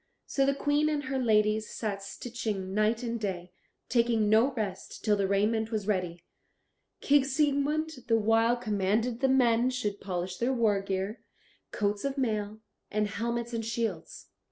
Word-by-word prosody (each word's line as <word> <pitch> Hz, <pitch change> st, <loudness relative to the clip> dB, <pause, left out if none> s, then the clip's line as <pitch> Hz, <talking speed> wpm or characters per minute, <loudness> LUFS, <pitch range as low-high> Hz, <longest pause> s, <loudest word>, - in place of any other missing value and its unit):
So 275 Hz, -1 st, +1 dB
the 275 Hz, -, +2 dB
Queen 290 Hz, +2 st, +1 dB
and 295 Hz, -1 st, -1 dB
her 265 Hz, 0 st, -2 dB
ladies 215 Hz, -2 st, +2 dB
sat 205 Hz, -3 st, -3 dB
stitching 205 Hz, -3 st, -4 dB
night 215 Hz, +3 st, +1 dB
and 235 Hz, -1 st, -2 dB
day, 185 Hz, -4 st, -4 dB, 0.4 s
taking 230 Hz, -3 st, +2 dB
no 225 Hz, +6 st, +4 dB
rest 215 Hz, -4 st, -5 dB
till 210 Hz, -2 st, +4 dB
the 200 Hz, -1 st, 0 dB
raiment 215 Hz, +3 st, +1 dB
was 215 Hz, -3 st, -2 dB
ready. 180 Hz, -4 st, -2 dB, 0.8 s
King 285 Hz, -1 st, +4 dB
Siegmund 290 Hz, +3 st, +1 dB, 0.2 s
the 225 Hz, -2 st, +4 dB
while 225 Hz, +2 st, +3 dB
commanded 220 Hz, +1 st, 0 dB
that 270 Hz, -, +3 dB
the -, -, 0 dB
men 245 Hz, -2 st, +4 dB
should 215 Hz, -6 st, -3 dB
polish 180 Hz, -1 st, -3 dB
their 245 Hz, +3 st, 0 dB
war 215 Hz, -5 st, +2 dB
gear, 195 Hz, +3 st, -3 dB, 0.5 s
coats 205 Hz, -1 st, -1 dB
of 275 Hz, 0 st, -2 dB
mail, 215 Hz, -4 st, -2 dB, 0.3 s
and 210 Hz, 0 st, 0 dB
helmets, 235 Hz, +2 st, -3 dB
and 225 Hz, -1 st, -2 dB
shields. 220 Hz, -6 st, -4 dB
225 Hz, 160 wpm, -29 LUFS, 205-245 Hz, 0.8 s, no